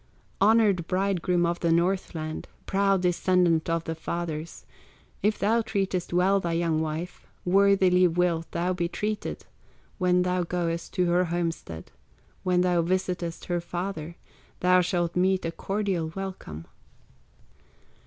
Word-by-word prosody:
"Honored 205 Hz, -5 st, +4 dB
bridegroom 185 Hz, -2 st, +1 dB
of 170 Hz, 0 st, -1 dB
the 170 Hz, -, +1 dB
Northland, 170 Hz, -2 st, -1 dB, 0.2 s
Proud 195 Hz, -1 st, +2 dB
descendant 175 Hz, -2 st, +2 dB
of 165 Hz, 0 st, 0 dB
the 165 Hz, -, -3 dB
fathers, 165 Hz, 0 st, -5 dB, 0.6 s
If 210 Hz, +1 st, +1 dB
thou 225 Hz, +3 st, +2 dB
treatest 195 Hz, -5 st, -2 dB
well 185 Hz, +3 st, +3 dB
thy 170 Hz, -3 st, -2 dB
young 165 Hz, -2 st, +1 dB
wife, 160 Hz, +3 st, -5 dB, 0.2 s
Worthily 185 Hz, -1 st, +4 dB
wilt 170 Hz, -1 st, 0 dB
thou 175 Hz, +2 st, -1 dB
be 175 Hz, -1 st, -1 dB
treated; 210 Hz, +4 st, -4 dB, 0.5 s
When 180 Hz, -1 st, +3 dB
thou 180 Hz, 0 st, 0 dB
goest 170 Hz, -1 st, -2 dB
to 180 Hz, -2 st, +2 dB
her 175 Hz, +1 st, +2 dB
homestead, 165 Hz, -, -4 dB, 0.5 s
When 180 Hz, -1 st, +2 dB
thou 180 Hz, -1 st, +2 dB
visitest 180 Hz, -1 st, -2 dB
her 175 Hz, -1 st, -1 dB
father, 175 Hz, -2 st, -5 dB, 0.5 s
Thou 180 Hz, 0 st, +5 dB
shalt 175 Hz, -1 st, -1 dB
meet 185 Hz, 0 st, +2 dB
a 165 Hz, -, -1 dB
cordial 190 Hz, -4 st, -2 dB
welcome. 185 Hz, -, -6 dB
180 Hz, 130 wpm, -26 LUFS, 170-190 Hz, 0.6 s, Thou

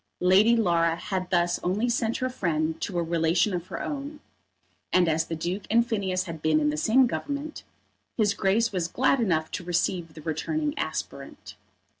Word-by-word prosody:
Lady 200 Hz, +6 st, +5 dB
Laura 170 Hz, -6 st, +2 dB
had 185 Hz, +2 st, -4 dB
thus 175 Hz, -1 st, +1 dB
only 200 Hz, +7 st, 0 dB
sent 235 Hz, -1 st, 0 dB
her 255 Hz, -, -1 dB
friend 160 Hz, -9 st, -2 dB
to 185 Hz, -, -3 dB
a 170 Hz, -, +1 dB
relation 170 Hz, +4 st, +1 dB
of 175 Hz, 0 st, -4 dB
her -, -, -6 dB
own, 290 Hz, +1 st, -5 dB, 0.7 s
and 180 Hz, -1 st, +4 dB
as 160 Hz, 0 st, +1 dB
the 165 Hz, -, -3 dB
Duke 175 Hz, +5 st, -4 dB
and 235 Hz, +2 st, +4 dB
Phineas 195 Hz, -5 st, -1 dB
had 165 Hz, -4 st, -8 dB
been 155 Hz, 0 st, +3 dB
in 150 Hz, 0 st, +1 dB
the -, -, -3 dB
same 235 Hz, +11 st, +4 dB
Government, 285 Hz, +5 st, -4 dB, 0.5 s
his 210 Hz, -3 st, +2 dB
Grace 210 Hz, +4 st, +1 dB
was 180 Hz, -4 st, -1 dB
glad 260 Hz, +8 st, +2 dB
enough 160 Hz, -8 st, 0 dB
to -, -, -4 dB
receive 175 Hz, -1 st, -1 dB
the 155 Hz, -, -11 dB
returning 295 Hz, -, -2 dB
aspirant. -, -, -6 dB
185 Hz, 180 wpm, -26 LUFS, 165-230 Hz, 0.7 s, Lady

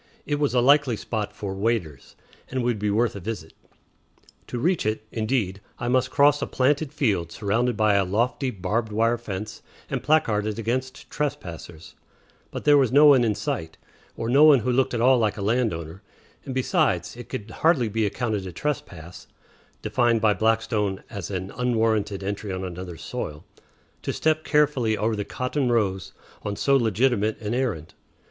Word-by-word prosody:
It 145 Hz, -1 st, -1 dB
was 145 Hz, -3 st, 0 dB
a 125 Hz, -, +4 dB
likely 140 Hz, -1 st, +4 dB
spot 105 Hz, -1 st, -4 dB
for 100 Hz, -2 st, -5 dB
"waders," 95 Hz, -, -2 dB, 0.3 s
and 130 Hz, -1 st, -2 dB
would 120 Hz, -3 st, 0 dB
be 105 Hz, 0 st, 0 dB
worth 110 Hz, +2 st, +1 dB
a -, -, -5 dB
visit. 95 Hz, -5 st, -6 dB, 0.9 s
To 125 Hz, -, -4 dB
reach 170 Hz, +8 st, +1 dB
it, 110 Hz, 0 st, -2 dB
indeed, 110 Hz, -4 st, -1 dB, 0.2 s
I 120 Hz, -, -3 dB
must 130 Hz, 0 st, +2 dB
cross 145 Hz, +2 st, +4 dB
a -, -, -1 dB
planted 140 Hz, +2 st, +1 dB
field 100 Hz, -, 0 dB
surrounded 110 Hz, +5 st, 0 dB
by 110 Hz, -1 st, +3 dB
a 100 Hz, 0 st, +3 dB
lofty 120 Hz, +8 st, 0 dB
barbed 110 Hz, +2 st, -2 dB
wire 115 Hz, +2 st, +1 dB
fence 105 Hz, -2 st, -6 dB, 0.3 s
and -, -, -1 dB
placarded 110 Hz, -8 st, +1 dB
against 130 Hz, +3 st, -3 dB
trespassers; 85 Hz, -, -5 dB, 0.6 s
but -, -, -6 dB
there 145 Hz, -1 st, +6 dB
was 130 Hz, -4 st, +2 dB
no 145 Hz, +3 st, +7 dB
one 140 Hz, -4 st, +7 dB
in 110 Hz, -3 st, +1 dB
sight, 80 Hz, -4 st, -4 dB, 0.4 s
or 115 Hz, -, -3 dB
no 135 Hz, +5 st, +5 dB
one 150 Hz, -5 st, +7 dB
who 125 Hz, -, 0 dB
looked 125 Hz, 0 st, +1 dB
at 115 Hz, -, -1 dB
all 130 Hz, +1 st, +5 dB
like 110 Hz, -2 st, 0 dB
a 100 Hz, -, -4 dB
land 115 Hz, +2 st, +1 dB
owner; 80 Hz, +3 st, -7 dB, 0.4 s
and, 135 Hz, -2 st, -5 dB
besides, 130 Hz, -, +1 dB
it 120 Hz, -1 st, -10 dB
could 110 Hz, +1 st, -6 dB
hardly 160 Hz, -8 st, +4 dB
be 110 Hz, +1 st, -1 dB
accounted 105 Hz, -2 st, -2 dB
a -, -, -6 dB
trespass 90 Hz, -, -5 dB, 0.6 s
defined 120 Hz, -2 st, +2 dB
by 110 Hz, -1 st, +3 dB
Blackstone 110 Hz, -3 st, 0 dB
as 100 Hz, -5 st, -6 dB
an 95 Hz, 0 st, -4 dB
"unwarranted 110 Hz, -5 st, 0 dB
entry 100 Hz, +1 st, -4 dB
on 95 Hz, 0 st, -4 dB
another's 90 Hz, -2 st, -7 dB
soil" 75 Hz, 0 st, -6 dB, 0.6 s
to -, -, -2 dB
step 155 Hz, 0 st, 0 dB
carefully 140 Hz, -8 st, +2 dB
over 110 Hz, +1 st, 0 dB
the 105 Hz, -, -2 dB
cotton 125 Hz, +3 st, -2 dB
rows 95 Hz, -5 st, 0 dB, 0.3 s
on 105 Hz, 0 st, -4 dB
so 140 Hz, +5 st, +2 dB
legitimate 115 Hz, -2 st, +1 dB
an 105 Hz, 0 st, -3 dB
errand. 115 Hz, -12 st, -2 dB
115 Hz, 175 wpm, -24 LUFS, 100-130 Hz, 0.9 s, no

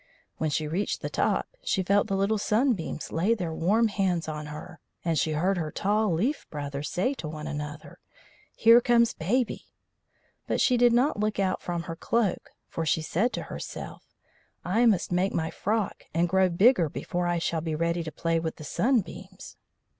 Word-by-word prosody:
When 155 Hz, -, 0 dB
she 150 Hz, +2 st, -1 dB
reached 180 Hz, +7 st, -2 dB
the -, -, -4 dB
top -, -, +1 dB, 0.2 s
she 195 Hz, -, 0 dB
felt 200 Hz, +2 st, +2 dB
the 195 Hz, -, -1 dB
little 200 Hz, +2 st, +1 dB
sunbeams 215 Hz, -, 0 dB
lay 190 Hz, +8 st, +2 dB
their 175 Hz, -6 st, -3 dB
warm 210 Hz, +8 st, +2 dB
hands 185 Hz, -6 st, 0 dB
on 150 Hz, -1 st, -5 dB
her, 155 Hz, +3 st, -9 dB, 0.3 s
and 165 Hz, -1 st, +1 dB
she 155 Hz, +1 st, +1 dB
heard 180 Hz, +5 st, +1 dB
her 155 Hz, -2 st, -2 dB
tall 210 Hz, +1 st, +1 dB
leaf 225 Hz, -, -1 dB
brothers 145 Hz, -1 st, -4 dB
say 205 Hz, +10 st, 0 dB
to 175 Hz, -, -7 dB
one 155 Hz, 0 st, -6 dB
another: 150 Hz, +1 st, -6 dB, 0.6 s
"Here 230 Hz, +1 st, +7 dB
comes 235 Hz, -1 st, +3 dB
Baby." 235 Hz, +9 st, -1 dB, 0.8 s
But -, -, 0 dB
she 255 Hz, -, +4 dB
did 240 Hz, 0 st, +5 dB
not 245 Hz, 0 st, +2 dB
look 215 Hz, 0 st, 0 dB
out 190 Hz, -1 st, 0 dB
from 175 Hz, -1 st, -3 dB
her 165 Hz, -, -6 dB
cloak, 210 Hz, +2 st, -1 dB, 0.2 s
for 165 Hz, -, -4 dB
she 160 Hz, 0 st, +1 dB
said 205 Hz, +10 st, 0 dB
to -, -, -3 dB
herself: -, -, -8 dB, 0.5 s
"I 225 Hz, +7 st, +3 dB
must 195 Hz, -6 st, +2 dB
make 180 Hz, +2 st, +1 dB
my 160 Hz, 0 st, -1 dB
frock 215 Hz, -1 st, -2 dB
and 170 Hz, +1 st, +3 dB
grow 190 Hz, +1 st, +3 dB
bigger 180 Hz, -, +4 dB
before 175 Hz, +4 st, -3 dB
I 175 Hz, 0 st, +1 dB
shall 165 Hz, -1 st, -1 dB
be 160 Hz, -1 st, -2 dB
ready 170 Hz, +2 st, 0 dB
to 160 Hz, -, -6 dB
play 165 Hz, +1 st, 0 dB
with 160 Hz, -1 st, -3 dB
the 155 Hz, -, -10 dB
sunbeams." 195 Hz, -, -2 dB
180 Hz, 185 wpm, -27 LUFS, 160-215 Hz, 0.8 s, Here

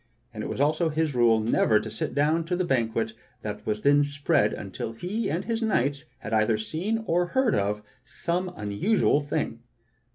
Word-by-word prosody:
And -, -, -5 dB
it -, -, -4 dB
was -, -, -4 dB
also 155 Hz, +4 st, +2 dB
his 155 Hz, -1 st, 0 dB
rule 120 Hz, -2 st, +4 dB
never 110 Hz, 0 st, +3 dB
to 110 Hz, -, -6 dB
sit 110 Hz, -, -4 dB
down 155 Hz, +3 st, +2 dB
to 180 Hz, +2 st, -1 dB
the 180 Hz, 0 st, 0 dB
banquet 115 Hz, -5 st, 0 dB, 0.3 s
that 105 Hz, -1 st, -5 dB
was 105 Hz, 0 st, -1 dB
then 145 Hz, +1 st, +5 dB
spread 145 Hz, -4 st, +1 dB
until 110 Hz, +3 st, -5 dB
he 195 Hz, -, -3 dB
and 175 Hz, +4 st, -2 dB
his 230 Hz, 0 st, -1 dB
knights 145 Hz, -, 0 dB
had 110 Hz, -, -6 dB
either 110 Hz, 0 st, +3 dB
seen, 185 Hz, -, -2 dB
or 175 Hz, -1 st, +1 dB
heard 260 Hz, +2 st, +2 dB
of, 105 Hz, +1 st, 0 dB, 0.2 s
some 175 Hz, +7 st, -2 dB
unusual 105 Hz, -, +2 dB
thing. 145 Hz, -5 st, -2 dB
145 Hz, 185 wpm, -26 LUFS, 110-175 Hz, 0.3 s, then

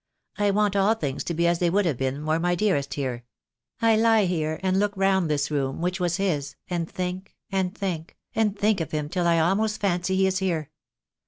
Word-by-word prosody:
I 205 Hz, 0 st, +3 dB
want 205 Hz, 0 st, +2 dB
all 200 Hz, +3 st, +3 dB
things 145 Hz, -10 st, -3 dB
to 170 Hz, -, -2 dB
be 170 Hz, +1 st, +1 dB
as 170 Hz, 0 st, +2 dB
they 175 Hz, -, +2 dB
would 200 Hz, +3 st, +2 dB
have 150 Hz, -8 st, -1 dB
been 135 Hz, +3 st, -2 dB
were 155 Hz, +1 st, +1 dB
my 175 Hz, +1 st, +1 dB
dearest 175 Hz, -9 st, 0 dB
here. 130 Hz, -4 st, -3 dB, 0.6 s
I 225 Hz, -1 st, +5 dB
lie 225 Hz, -1 st, +4 dB
here 160 Hz, -3 st, -1 dB
and 190 Hz, 0 st, +2 dB
look 205 Hz, 0 st, +1 dB
round 190 Hz, -3 st, +2 dB
this 145 Hz, 0 st, 0 dB
room, 135 Hz, -2 st, -1 dB
which 180 Hz, +2 st, -1 dB
was 175 Hz, -1 st, 0 dB
his, 150 Hz, -8 st, -1 dB
and 170 Hz, -2 st, -2 dB
think 185 Hz, +1 st, -5 dB, 0.2 s
and 190 Hz, +1 st, -1 dB
think, 175 Hz, -5 st, -4 dB, 0.2 s
and 215 Hz, -2 st, +1 dB
think 210 Hz, -2 st, +2 dB
of 160 Hz, -, -3 dB
him 150 Hz, -1 st, -2 dB
till 175 Hz, 0 st, 0 dB
I 170 Hz, -1 st, +4 dB
almost 200 Hz, +6 st, +1 dB
fancy 190 Hz, -1 st, 0 dB
he 190 Hz, 0 st, +3 dB
is 190 Hz, -1 st, +1 dB
here. 165 Hz, -6 st, -2 dB
180 Hz, 220 wpm, -25 LUFS, 155-195 Hz, 0.6 s, I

